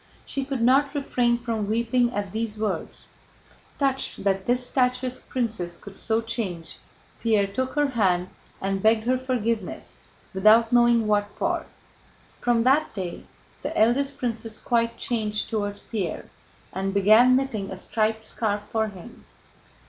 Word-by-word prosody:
She 275 Hz, -, -2 dB
could 265 Hz, -4 st, -2 dB
not 275 Hz, +4 st, +4 dB
refrain 245 Hz, -4 st, +1 dB
from 230 Hz, -3 st, -3 dB
weeping 235 Hz, +2 st, +2 dB
at 200 Hz, -4 st, -3 dB
these 220 Hz, 0 st, -3 dB
words. 215 Hz, 0 st, -4 dB, 0.7 s
Touched 270 Hz, -2 st, 0 dB
that 195 Hz, -1 st, 0 dB
this 245 Hz, +1 st, +2 dB
statuesque 250 Hz, 0 st, -1 dB
princess 215 Hz, -9 st, -2 dB
could 200 Hz, -1 st, -12 dB
so 225 Hz, +2 st, 0 dB
change, 215 Hz, -8 st, -4 dB, 0.4 s
Pierre 215 Hz, -3 st, +3 dB
took 260 Hz, +7 st, -3 dB
her 295 Hz, -1 st, +2 dB
hand 185 Hz, -7 st, +1 dB, 0.3 s
and 195 Hz, 0 st, -1 dB
begged 220 Hz, +1 st, +4 dB
her 250 Hz, +3 st, +2 dB
forgiveness, 230 Hz, -6 st, -2 dB, 0.3 s
without 220 Hz, +4 st, +5 dB
knowing 240 Hz, -1 st, +5 dB
what 205 Hz, -1 st, +1 dB
for. 340 Hz, -1 st, -1 dB, 0.7 s
From 240 Hz, -1 st, +2 dB
that 275 Hz, +5 st, +3 dB
day 185 Hz, -3 st, -5 dB, 0.4 s
the -, -, -4 dB
eldest 275 Hz, +5 st, +2 dB
princess 230 Hz, -4 st, -3 dB
quite 230 Hz, -1 st, 0 dB
changed 215 Hz, -3 st, -1 dB
toward 205 Hz, -2 st, -2 dB
Pierre 195 Hz, -8 st, -3 dB, 0.5 s
and 195 Hz, +1 st, -2 dB
began 215 Hz, +6 st, +6 dB
knitting 230 Hz, -7 st, -1 dB
a 190 Hz, -, -5 dB
striped 220 Hz, +3 st, -1 dB
scarf 205 Hz, -3 st, -1 dB
for 220 Hz, +1 st, -1 dB
him. 200 Hz, +3 st, -12 dB
225 Hz, 140 wpm, -25 LUFS, 205-250 Hz, 0.7 s, began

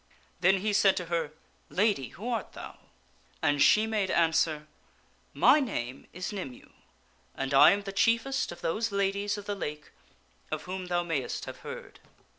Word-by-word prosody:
Then 185 Hz, +2 st, +3 dB
he 210 Hz, +1 st, 0 dB
said 200 Hz, -1 st, +4 dB
to 180 Hz, -, -2 dB
her, 165 Hz, -3 st, 0 dB, 0.2 s
" -, -, -37 dB
Lady, 200 Hz, -, +1 dB
who 210 Hz, -, -9 dB
art 235 Hz, -2 st, -3 dB
thou? -, -, -10 dB, 0.3 s
" -, -, -34 dB
and 145 Hz, -2 st, +2 dB
she 215 Hz, +8 st, +6 dB
made 215 Hz, -4 st, -1 dB
answer, 160 Hz, -2 st, +2 dB, 0.4 s
" -, -, -36 dB
My -, -, +8 dB
name 135 Hz, -, -4 dB
is 185 Hz, +3 st, -5 dB
Nymue 160 Hz, -11 st, -7 dB, 0.6 s
and 135 Hz, +1 st, -3 dB
I 135 Hz, -, +9 dB
am 205 Hz, 0 st, +1 dB
the 195 Hz, -, -5 dB
chiefest 235 Hz, +6 st, +1 dB
of 175 Hz, -, -10 dB
those 215 Hz, +7 st, -1 dB
Ladies 200 Hz, +1 st, 0 dB
of 205 Hz, -, -8 dB
the 205 Hz, -, -2 dB
Lake 150 Hz, -6 st, -6 dB, 0.6 s
of -, -, -4 dB
whom 185 Hz, 0 st, -5 dB
thou 175 Hz, 0 st, 0 dB
mayst 155 Hz, -7 st, -3 dB
have -, -, -8 dB
heard. -, -, -9 dB
190 Hz, 180 wpm, -29 LUFS, 160-205 Hz, 0.6 s, I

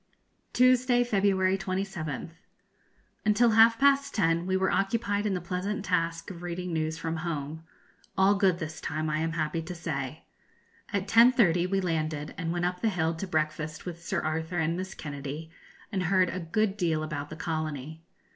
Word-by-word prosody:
_ -, -, -41 dB
Tuesday, 255 Hz, -1 st, +4 dB
February 195 Hz, -4 st, +2 dB
27th. 185 Hz, -5 st, -3 dB, 0.9 s
Until 220 Hz, +2 st, +4 dB
half 225 Hz, +1 st, +6 dB
past 280 Hz, +1 st, +3 dB
ten 170 Hz, -3 st, +2 dB
we 190 Hz, 0 st, +2 dB
were 190 Hz, 0 st, +1 dB
occupied 205 Hz, 0 st, 0 dB
in 195 Hz, -, 0 dB
the -, -, -1 dB
pleasant 180 Hz, +4 st, -3 dB
task 165 Hz, -1 st, -1 dB
of 175 Hz, -2 st, -9 dB
reading 175 Hz, 0 st, -4 dB
news 160 Hz, 0 st, -1 dB
from 165 Hz, 0 st, -3 dB
home 160 Hz, -1 st, -4 dB, 0.5 s
all 190 Hz, +1 st, +5 dB
good 195 Hz, -3 st, +3 dB
this 160 Hz, -2 st, -6 dB
time, 155 Hz, 0 st, -2 dB
I 155 Hz, -, 0 dB
am 160 Hz, 0 st, -1 dB
happy 165 Hz, 0 st, -1 dB
to 175 Hz, +2 st, -7 dB
say. 150 Hz, -3 st, -4 dB, 0.7 s
At 200 Hz, -1 st, -1 dB
10.30 215 Hz, -7 st, +5 dB
we 195 Hz, 0 st, +1 dB
landed 155 Hz, -4 st, -2 dB
and 165 Hz, -1 st, -3 dB
went 175 Hz, 0 st, -1 dB
up 180 Hz, 0 st, -2 dB
the 225 Hz, -, +2 dB
hill 165 Hz, -4 st, 0 dB
to 165 Hz, +4 st, -5 dB
breakfast 155 Hz, -1 st, -2 dB
with 170 Hz, -1 st, -7 dB
Sir 190 Hz, -1 st, -1 dB
Arthur 160 Hz, +3 st, -2 dB
and 165 Hz, 0 st, +1 dB
Miss 190 Hz, +1 st, -5 dB
Kennedy, 145 Hz, +2 st, -6 dB, 0.4 s
and 195 Hz, -3 st, -1 dB
heard 185 Hz, +1 st, +3 dB
a 185 Hz, -, -4 dB
good 195 Hz, +4 st, 0 dB
deal 165 Hz, -5 st, 0 dB
about 150 Hz, -2 st, -4 dB
the 155 Hz, -, -7 dB
colony. 155 Hz, -2 st, -4 dB
175 Hz, 175 wpm, -28 LUFS, 160-195 Hz, 0.9 s, half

